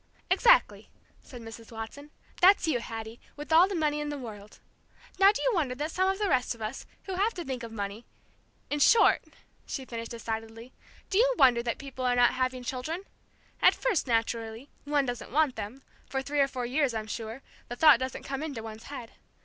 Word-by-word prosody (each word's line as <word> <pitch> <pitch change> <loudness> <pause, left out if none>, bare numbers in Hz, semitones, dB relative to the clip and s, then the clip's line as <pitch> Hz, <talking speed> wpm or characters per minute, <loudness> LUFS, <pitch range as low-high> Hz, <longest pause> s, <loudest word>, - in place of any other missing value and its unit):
"Exactly," - - +4 0.3
said 245 -2 -12
Mrs. 225 0 -11
Watson. 225 +6 -8 0.3
"That's 370 -1 +6
you, 290 -6 +1
Hattie, 225 0 -7 0.2
with 295 +2 -4
all 340 +3 +7
the 395 - -4
money 300 -2 0
in 295 0 -3
the 290 - -4
world. 210 -5 -9 0.6
Now 390 +1 +8
do 420 - -4
you - - +3
wonder 290 -9 0
that 300 +4 -3
some 375 +2 +1
of 385 - 0
the 415 0 0
rest 250 -7 +1
of 230 - -16
us, 215 +5 -5 0.2
who 385 - -5
have 405 +5 0
to 350 -2 -5
think 260 -2 -4
of 230 -1 -7
money 205 +1 -5 0.6
in 295 - 0
short," 455 +9 +5 0.4
she 265 - -5
finished 230 -2 -6
decidedly, 225 +1 -6 0.4
"do 390 - +3
you - - +4
wonder 245 -3 +5
that 235 -1 -2
people 270 -2 -7
are 250 -1 +2
not 245 0 +5
having 255 0 -1
children? 265 +9 -4 0.6
At - - +6
first, 445 - 0
naturally, 230 +1 -2
one 290 -1 +1
doesn't 245 -2 -5
want 295 -1 +2
them, 245 +7 -7 0.3
for 265 0 -2
three 290 +1 -2
or 275 - +5
four 255 -2 -4
years, 260 -1 0
I'm 220 -1 -3
sure, 225 +4 -6 0.2
the 245 - -5
thought 295 -2 +7
doesn't 260 0 -4
come 275 0 -4
into 280 -8 -5
one's 220 0 -9
head. 255 -5 -8
260 Hz, 205 wpm, -28 LUFS, 230-305 Hz, 0.6 s, Now